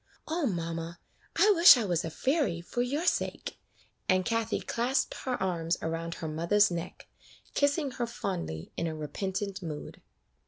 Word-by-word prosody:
"O 320 -2 0
mamma! 165 -2 -3 0.4
I 420 - +6
wish 340 -7 +9
I 230 - 0
was 175 -3 0
a 165 - -3
fairy, 260 - 0
for 180 +8 -3
your 285 +7 -1
sake;" - - -1 0.5
and 185 -1 +3
Kathie 230 -1 0
clasped 255 +3 0
her 255 -2 -1
arms 175 -3 0
around 165 +1 -3
her 160 - -5
mother's 170 +6 +3
neck, 170 +1 -6 0.5
kissing 285 0 +1
her 240 -1 -3
fondly, 175 - -4
in 170 - -1
a 160 - -3
repentant 190 +6 -4
mood. 155 -4 -7
190 Hz, 155 wpm, -29 LUFS, 165-250 Hz, 0.5 s, wish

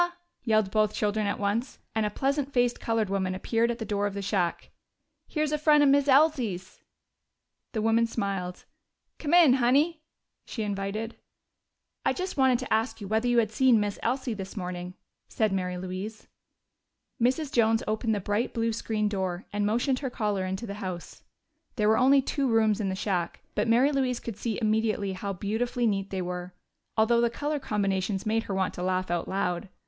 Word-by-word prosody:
yelled 215 -4 +2
both 215 0 +2
children 210 0 0
at 200 - -1
once, 210 +5 -1 0.2
and 220 -1 +1
a - - -1
pleasant 275 +5 -1
faced 245 -2 +1
colored 225 -2 0
woman 190 -1 -1
appeared 230 +5 +1
at 235 - -2
the 225 - -5
door 205 -1 0
of 200 - -6
the 200 - -3
shack. 190 -3 -1 0.6
"Here's 305 -1 -1
a 300 - 0
frien' 300 -1 +5
of 285 - +5
Miz 285 0 +4
Elsie's!" 260 - +2 0.9
The 220 -2 -1
woman 225 +1 +3
smiled. 195 -5 -3 0.5
"Come 315 +2 +1
in, 330 -7 +7
Honey," 280 +6 +2 0.4
she 225 - -5
invited. 205 +2 -3 0.9
"I - - +2
just 370 0 -4
wanted 265 -3 +4
to - - -3
ask 225 +3 0
you 200 - -6
whether 220 +4 +1
you 240 0 +2
had 220 -2 +3
seen 245 0 +4
Miss 205 -1 -2
Elsie 250 0 -1
this 195 0 -7
morning," 180 -1 -5 0.3
said 215 -2 +1
Mary 180 -1 -2
Louise. 185 +4 -6 1.0
Mrs. 265 +5 +1
Jones 225 -1 +3
opened 220 +1 0
the - - -1
bright 205 +4 -1
blue 230 0 0
screen 215 -1 -1
door 190 -3 -2
and 205 0 +1
motioned 245 +4 +1
her 270 - -3
caller 205 -5 -1
into 190 +5 -3
her 200 - -5
house. 185 -4 -6 0.5
There 210 -3 +1
were 220 +1 +4
only 270 +2 +5
two 275 0 -1
rooms 220 -2 +3
in 195 - -1
the 190 - -2
shack, 185 -3 -2
but 210 +2 0
Mary 245 +5 +4
Louise 260 -3 0
could 230 - -6
see 220 +1 -3
immediately 215 -3 0
how 195 +2 -4
beautifully 230 +6 -1
neat 200 -3 0
they 190 -1 -3
were, 180 0 -5 0.4
although 235 +2 +4
the 235 - +3
color 290 +5 -2
combinations 195 -4 -1
made 220 +1 +1
her 195 - -3
want 190 -1 0
to - - -6
laugh 185 -1 -1
out 175 -1 -1
loud. 190 -1 -2
220 Hz, 190 wpm, -27 LUFS, 195-245 Hz, 1.0 s, in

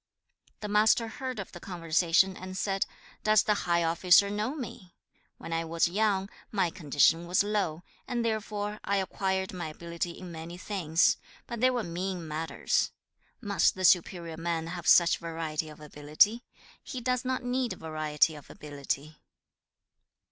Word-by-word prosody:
3. - - -51
The 210 - -3
Master 215 +2 +4
heard 255 +2 -5
of 195 - -6
the 175 - -10
conversation 175 +1 +2
and 185 0 -7
said, 195 0 0 0.4
'Does 215 -1 +5
the 210 - +2 0.2
high 170 0 +3
officer 175 +4 +4
know 215 +7 -2
me? 210 - -8 0.4
When 165 - -6
I 165 0 0
was 165 +1 +1
young, 195 +1 +1 0.2
my 190 -5 +1
condition 160 +2 +2
was 180 +3 +3
low, 200 -6 -1 0.2
and 240 -1 -1
therefore 210 -1 -2
I 200 - +1
acquired 190 0 -1
my 175 -3 -4
ability 170 +2 -5
in 180 -2 -9
many 165 +1 -8
things, 180 -4 +2 0.3
but 235 -2 -6
they 255 - +6
were 245 -3 -1
mean 175 -1 -4
matters. 155 +1 0 0.5
Must 200 -6 +2
the 185 0 -1
superior 170 -2 +2
man 165 -1 -2
have 175 -3 -6
such 170 -1 +6
variety 160 -2 -3
of 150 - -12
ability? 150 - +1 0.4
He 255 - -6
does 250 +1 0
not 255 0 -2
need 245 0 -1
variety 155 -1 0
of 150 -2 -12
ability.' 145 +1 -5
180 Hz, 155 wpm, -29 LUFS, 165-210 Hz, 0.5 s, they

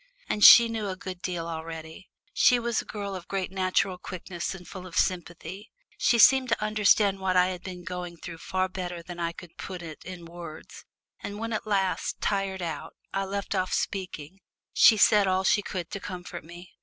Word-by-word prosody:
And 210 - -1
she 235 -1 +11
knew 225 -2 -3
a 190 - -3
good 185 -1 -8
deal 175 -3 -3
already. 160 +2 -7 0.2
She 250 - +5
was 235 -1 -1
a - - -15
girl 200 -2 -5
of 180 -2 -7
great 190 -2 -3
natural 185 0 0
quickness 175 0 -5
and 180 -2 -12
full 185 -1 -8
of 180 - -7
sympathy. 180 +3 -2 0.3
She 235 - +3
seemed 260 +2 +6
to 235 - +1
understand 210 -2 +3
what 185 -1 +1
I 180 0 +5
had 180 -1 -5
been 180 -2 -8
going 180 -1 -6
through 165 0 -9
far 185 +2 -1
better 180 -2 -6
than 175 0 -9
I 170 -1 -1
could 170 0 -13
put 180 -2 -7
it 155 -3 -9
in 180 -2 -8
words, 170 -2 -10 0.4
and 205 - -6
when 230 +1 -4
at 215 - -3
last, 195 -3 0
tired 195 -2 -1
out, 160 -1 -5 0.2
I 195 0 0
left 200 +1 -3
off 185 -2 -1
speaking, 185 -2 -3 0.3
she 220 - +7
said 205 -1 +5
all 185 0 +1
she 205 - +3
could 180 -4 -5
to 200 - -4
comfort 180 -2 -7
me. 175 +2 -12
185 Hz, 200 wpm, -27 LUFS, 175-200 Hz, 0.4 s, she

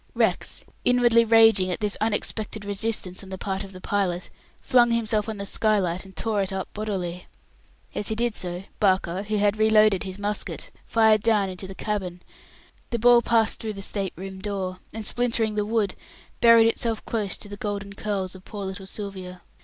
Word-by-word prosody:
Rex, - - 0 0.2
inwardly 240 -2 +5
raging 225 -4 +5
at 180 - -2
this 210 -1 -1
unexpected 215 -1 -2
resistance 200 -2 -2
on 195 - -12
the 190 - -5
part 195 +1 -3
of 195 - -10
the 185 - -10
pilot, 185 -2 -1 0.3
flung 245 -2 +4
himself 225 -2 +1
on 220 - -4
the 200 - -5
skylight, 195 -4 0
and 190 -1 -14
tore 215 -3 0
it 195 - -2
up 190 0 -4
bodily. 185 -5 -4 0.7
As 205 - -1
he 220 - 0
did 235 0 0
so, 180 -2 -4 0.2
Barker, 190 -2 +2
who 210 +1 -2
had 205 +1 +2
reloaded 215 -3 +5
his 190 -1 -5
musket, 205 +1 -2 0.2
fired 220 -2 +4
down 210 -3 +2
into 185 +1 -6
the 190 - -9
cabin. 185 -4 -3 0.7
The 235 - -1
ball 240 +1 +6
passed 225 -2 +2
through 220 -2 -3
the 195 -1 -8
state 195 -1 -3
room 190 +2 -7
door, 190 -2 -3
and 220 0 -6
splintering 230 -2 0
the 210 0 -1
wood, 215 -4 +1 0.5
buried 230 -1 +7
itself 230 -1 -1
close 210 -4 -2
to - - -11
the 205 - -7
golden 200 -1 -4
curls 200 -3 -3
of 190 -1 -12
poor 205 -1 -6
little 190 0 -6
Sylvia. 190 -3 -7
205 Hz, 185 wpm, -25 LUFS, 190-220 Hz, 0.7 s, buried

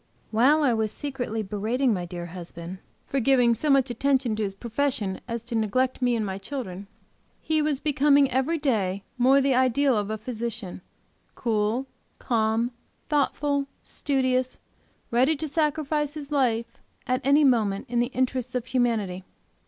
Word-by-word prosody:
While 270 +8 +4
I 255 -4 +3
was 220 -2 0
secretly 245 -6 -4
braiding 220 +5 0
my 180 -3 -2
dear 175 0 -6
husband 175 +1 -8 0.3
for 275 - -1
giving 245 -1 +4
so 280 +5 +2
attention 265 -2 +1
to 215 - -3
his 195 -2 -2
profession 235 -3 -2
as 230 -1 -4
to 240 +1 -8
neglect 255 +5 0
me 245 -1 +2
and 220 -2 -1
my 190 -1 -4
children, 200 -5 -6 0.5
he 315 -1 0
was 300 -3 0
becoming, 285 -1 +4
every 265 +6 +1
day, 200 -10 0 0.2
more 265 +3 +5
the 275 0 +2
ideal 260 +1 +3
of 205 -1 -1
a 220 - -2
physician, 220 -4 -5 0.5
cool, 225 +2 0 0.3
calm, 230 0 0 0.4
thoughtful, 285 -1 +1 0.2
studious, 260 -2 -1 0.5
ready 255 +7 +3
to 310 +2 -3
sacrifice 300 -1 0
his 295 -1 -8
life 235 -5 0 0.3
at 255 +1 0
any 285 +3 +5
moment 220 -7 +2
in 240 0 0
the 240 - +2
interests 255 -1 -2
of 250 -2 -1
humanity. 225 -8 0
250 Hz, 155 wpm, -26 LUFS, 220-275 Hz, 0.5 s, more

